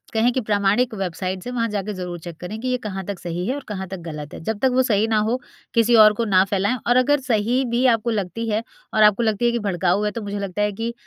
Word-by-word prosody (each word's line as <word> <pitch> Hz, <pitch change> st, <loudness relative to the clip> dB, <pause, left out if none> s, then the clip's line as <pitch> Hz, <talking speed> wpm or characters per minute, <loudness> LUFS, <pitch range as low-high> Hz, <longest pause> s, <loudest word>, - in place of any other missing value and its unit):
कहें 225 Hz, +2 st, +3 dB
कि 260 Hz, -, 0 dB
प्रामाणिक 210 Hz, +2 st, +1 dB
वेबसाइट्स 185 Hz, -1 st, -4 dB
से 245 Hz, -, -5 dB
वहाँ 235 Hz, -2 st, -1 dB
जाकर 210 Hz, 0 st, -3 dB
ज़रूर 180 Hz, -2 st, -5 dB
चेक 170 Hz, 0 st, -9 dB
करें 190 Hz, +5 st, -6 dB
कि 255 Hz, -, -3 dB
ये 255 Hz, -, +1 dB
कहाँ 195 Hz, -5 st, -5 dB
तक 200 Hz, 0 st, -5 dB
सही 175 Hz, +1 st, -4 dB
है 255 Hz, -, 0 dB
और 285 Hz, -, -6 dB
कहाँ 190 Hz, -3 st, -4 dB
तक 190 Hz, +1 st, -6 dB
गलत 150 Hz, -2 st, -7 dB
है। -, -, -8 dB
जब 220 Hz, +2 st, -2 dB
तक 265 Hz, -, +4 dB
वो 260 Hz, -, +4 dB
सही 220 Hz, -4 st, +2 dB
ना 220 Hz, -1 st, +2 dB
हो 250 Hz, +3 st, 0 dB, 0.3 s
किसी 230 Hz, 0 st, +4 dB
और 215 Hz, -1 st, +8 dB
को 230 Hz, -, -1 dB
ना 190 Hz, -3 st, +4 dB
फ़ैलाएँ 200 Hz, +4 st, 0 dB
और 245 Hz, -, +3 dB
अगर 285 Hz, +3 st, +3 dB
सही 245 Hz, +1 st, +1 dB
भी 240 Hz, +2 st, +1 dB
आपको 225 Hz, +1 st, -2 dB
लगती 220 Hz, +2 st, -3 dB
है 215 Hz, +1 st, 0 dB, 0.3 s
और 215 Hz, -, +4 dB
आपको 210 Hz, +2 st, +5 dB
लगती 220 Hz, 0 st, 0 dB
है 235 Hz, -, +3 dB
कि 235 Hz, -, 0 dB
भड़काऊ 180 Hz, +1 st, +1 dB
है 210 Hz, -, +1 dB
तो -, -, -5 dB
मुझे 205 Hz, 0 st, -4 dB
लगता 200 Hz, 0 st, -3 dB
है 210 Hz, 0 st, +1 dB
कि 230 Hz, +3 st, -3 dB
210 Hz, 275 wpm, -22 LUFS, 190-235 Hz, 0.3 s, और